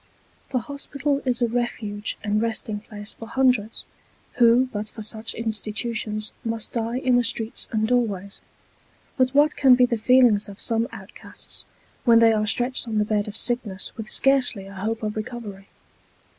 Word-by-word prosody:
The 265 - 0
hospital 280 +2 -2
is 245 -1 +1
a - - +3
refuge 220 -3 -3
and 210 0 +1
resting 220 -2 -2
place 205 -1 -7
for 225 - -10
hundreds, 250 -4 +1 0.5
who 240 +2 +5
but 210 0 -3
for 220 - -8
such 220 +1 -3
institutions 220 0 -2
must 225 -2 -3
die 230 +1 -2
in 255 -1 +2
the 245 - +3
streets 230 -1 -1
and 220 -1 +1
doorways; 205 -5 -1 0.7
but 255 0 +1
what 295 +1 +4
can 270 -3 +6
be 250 0 +5
the 235 -2 -1
feelings 235 -3 +4
of 200 - -11
some 230 0 +1
outcasts - - -10 0.4
when 235 -2 +6
they 230 -1 +6
are 215 -1 0
stretched 245 +3 0
on 220 -1 -2
the 210 - +2
bed 210 -1 0
of 210 +1 -4
sickness 235 -6 -1
with 220 -1 -7
scarcely 260 -7 +2
a 195 - -11
hope 220 +4 -3
of 210 0 -2
recovery? 215 -3 -6
225 Hz, 170 wpm, -24 LUFS, 210-245 Hz, 0.7 s, can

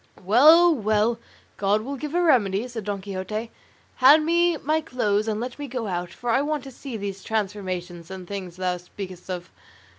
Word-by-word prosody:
"Well, 315 - +7
well, 220 -1 +1 0.4
God 205 +2 +1
will 275 +4 -4
give 300 +3 -5
a 355 - +3
remedy," 220 - +3
said 230 -4 -7
Don 200 -2 -3
Quixote; 200 +4 -5 0.5
"hand 290 +4 +7
me 340 0 +3
my 310 +3 0
clothes 215 -7 0
and 215 -1 -1
let 245 +3 -5
me 290 - -5
go 245 -3 -4
out, 175 -3 -3
for 240 +7 -4
I 265 - +3
want 295 -1 -2
to 270 - -9
see 255 -1 -7
these 195 -2 -5
transformations 185 -5 -3
and 190 -2 -8
things 185 -3 -6
thou 180 -1 -1
speakest 180 +1 -9
of." 180 -1 -5
215 Hz, 185 wpm, -24 LUFS, 190-270 Hz, 0.5 s, Well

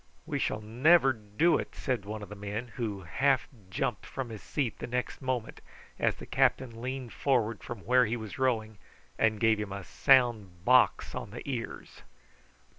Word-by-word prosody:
"We - - -2
shall 105 - -1
never 135 +6 +4
do 110 +10 +1
it," - - -6
said 125 -7 -2
one 105 0 -5
of 100 - -9
the 105 - -8
men, 105 +4 -5
who 110 -4 -4
half 135 - +1 0.2
jumped 95 - -2
from 130 -3 -5
his 110 -3 -8
seat 135 -7 -2
the - - -5
next 125 +3 -3
moment 130 -4 -3 0.4
as - - +2
the - - -10
captain 115 -3 +1
leaned 130 -1 -4
forward 115 -5 0
from 120 -4 -7
where 125 +1 +4
he 115 +2 -1
was 110 +4 -8
rowing 110 -5 0 0.4
and 110 -2 +2
gave 110 -2 +3
him 105 -2 -4
a 100 0 -5
sound 110 -9 +2
box 125 0 +4
on - - -5
the 120 +6 -9
ears. 125 -4 -5
115 Hz, 180 wpm, -30 LUFS, 105-130 Hz, 0.4 s, never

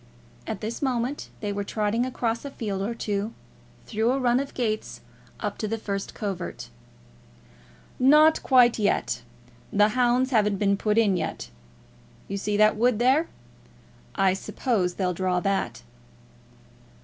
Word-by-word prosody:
At 215 -4 -4
this 220 +2 -4
moment 260 0 -2
they 205 -1 -2
were 205 0 -2
trotting 215 +4 -1
across 235 -2 -2
a 280 - -5
field 205 -7 -4
or 225 +4 -2
two, 210 0 -3 0.5
through 225 +3 +1
a 270 - 0
run 245 -1 +3
of 275 0 -5
gates 215 -4 -2 0.4
up - - -4
to 215 - -2
the 225 +2 -2
first 200 -2 -4
covert. 195 - -5 1.3
"Not 300 +4 +6
quite 245 -3 +5
yet. 200 - 0 0.5
The 210 +1 +4
hounds 250 +3 +2
haven't 210 -4 +2
been 200 0 +2
put 210 +2 0
in 205 -5 +3
yet. 110 - -4 0.8
You 200 - -3
see 205 +1 -1
that 215 0 +4
wood 240 0 +3
there? 265 +8 +3 0.9
I 195 -2 +3
suppose 190 -2 -1
they'll 185 -2 0
draw 180 0 0
that." 195 +1 -2
215 Hz, 145 wpm, -25 LUFS, 200-245 Hz, 1.3 s, Not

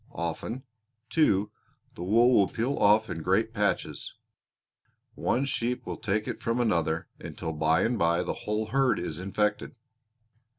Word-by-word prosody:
Often, 85 +9 -4 0.5
too, 105 -10 +2 0.4
the - - -10
wool 115 +7 +4
will 100 -5 +5
peel 120 +9 -2
off 105 +1 +4
in 80 - -5
great - - +1
patches. - - -2 1.0
One 135 - 0
sheep 125 -2 -2
will - - -5
take 105 0 -1
it - - -5
from 115 +1 -1
another, 85 -8 0
until 80 - -5
by 80 +3 +2
and 120 +1 0
by 85 +1 +2
the - - -2
whole 105 +1 -2
herd 135 -2 +3
is 80 -2 -4
infected." 105 +4 -1
105 Hz, 145 wpm, -28 LUFS, 85-120 Hz, 1.0 s, will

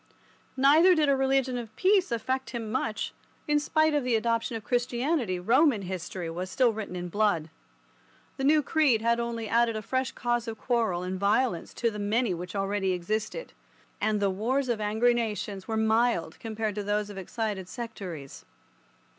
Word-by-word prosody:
Neither 310 +7 +6
did 305 -3 +3
a 275 - +4
religion 265 -1 +1
of 230 -3 -9
peace 380 -4 +3
affect 260 +3 -2
him 230 -2 -5
much, 225 -3 -2 0.3
for, - - -3
in 295 - +4
spite 310 +1 +2
of 290 -2 +1
the 250 -2 +1
adoption 230 +2 0
of 225 - -5
Christianity, 245 - 0
Roman 235 - +3
history 180 -1 -5
was 180 +3 -4
still 240 +4 +3
written 210 -4 -5
in 180 0 -4
blood. 175 -5 0 0.9
The 270 - -3
new 300 +2 +4
creed 270 -8 +2
had 235 0 +2
only 235 -1 -3
added 230 +1 +2
a 215 - -4
fresh 260 +3 -1
cause 240 0 -1
of 225 -1 -5
quarrel 225 -8 0
and 185 +1 -3
violence 200 -1 +1
to 230 -1 0
the 210 - -6
many 210 +1 +1
which 180 +3 -6
already 195 -1 0
existed, 215 - -3 0.5
and 215 0 +1
the 200 -1 +2
wars 250 +7 -1
of 225 -3 0
angry 220 +4 +3
nations 210 -4 -3
were 220 - -1
mild 220 -6 +1
compared 220 -1 -3
to 205 0 -4
those 205 0 -1
of 195 - -7
excited 195 -1 -4
sectaries. 185 - -7
225 Hz, 180 wpm, -28 LUFS, 200-255 Hz, 0.9 s, Neither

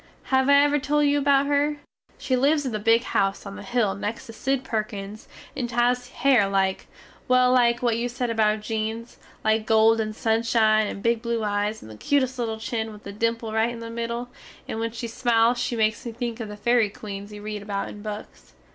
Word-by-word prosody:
Have 265 +1 +4
I 280 - +7
ever 290 0 +2
tole 295 +2 +1
you 290 0 +3
about 280 0 +3
her? 290 +1 +1 0.4
She 260 - 0
lives 285 +3 +2
in 260 - -2
the 215 - -2
big 230 +2 +3
house 195 -3 0
on 200 0 -7
the - - -8
hill 240 -5 0
next 205 +3 -5
to 225 - -10
Sid 265 +4 -1
Perkins 215 -3 -4 0.3
and 240 -2 -3
she 235 - -7
has 245 +1 +2
hare 245 -6 +3
like, 190 -1 0 0.4
well 255 0 +4
like 240 -1 +3
what 230 -2 +1
you 245 +1 -1
sed 245 -1 -2
about 215 -1 +2
Jean's, 220 +2 -4 0.2
like 220 0 +1
gold 225 0 +4
and 215 -1 -4
sunshine, 220 -1 +2
and 200 - -6
big 235 -1 +1
blue 235 -1 -2
eyes 205 +1 -1
and 110 - -11
the 110 - -11
cutest 260 - 0
little 225 -2 -2
chin 220 0 -3
with 210 0 -13
a 200 - -6
dimple 230 +1 -2
rite 220 +1 +2
in 240 -1 -7
the 230 0 -7
middle, 235 +1 -4 0.4
and 220 - -4
when 230 0 -1
she 235 +1 -6
smiles 230 +1 +2
she 245 - -1
makes 220 -1 +1
me 235 - -5
think 235 0 -4
of 220 -2 -5
the 210 - -8
ferry 235 -1 +2
queens 200 0 -8
you 205 0 -9
read 210 -1 -5
about 200 -1 -3
in 205 - -9
books. 210 0 -8
230 Hz, 220 wpm, -24 LUFS, 215-245 Hz, 0.4 s, I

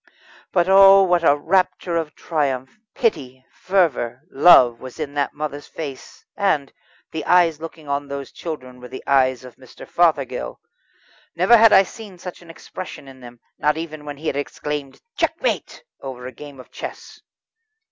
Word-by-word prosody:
But 175 -1 +2
oh! 195 0 +8
what 175 -2 +2
a 145 -3 +4
rapture 180 +2 0
of 160 -2 -3
triumph, 135 -5 -2 0.2
pity, 130 - -2
fervour, 150 -10 0
love, 130 -6 +6
was 130 +3 -10
in 145 -2 -4
that 145 -1 -2
mother's 145 -1 -5
face, 145 -5 -9
and 155 -9 0 0.4
the 160 - -4
eyes 170 -4 +3
looking 165 -2 -9
on 140 0 -2
those 140 -1 -6
children 130 -7 -7
were 125 - -10
the 130 +1 -9
eyes 130 -2 +2
of 125 - -13
Mr. 130 -2 -14
Fothergill. 145 - 0 0.8
Never 185 +8 +5
had 225 -1 +7
I 190 - +7
seen 205 -1 -11
such 180 0 -9
an 170 - -16
expression 165 -2 -9
in 135 -1 -13
them, 120 -1 -13 0.2
not 150 +1 +1
even 155 -2 -6
when 145 -1 -7
he 155 - -12
had 145 - -1
exclaimed 145 -1 -5 0.2
"Checkmate" - - -2 0.2
over 130 -2 -8
a 130 - -6
game 140 +2 -12
of 130 - -14
chess. - - -9
150 Hz, 165 wpm, -21 LUFS, 130-175 Hz, 0.8 s, oh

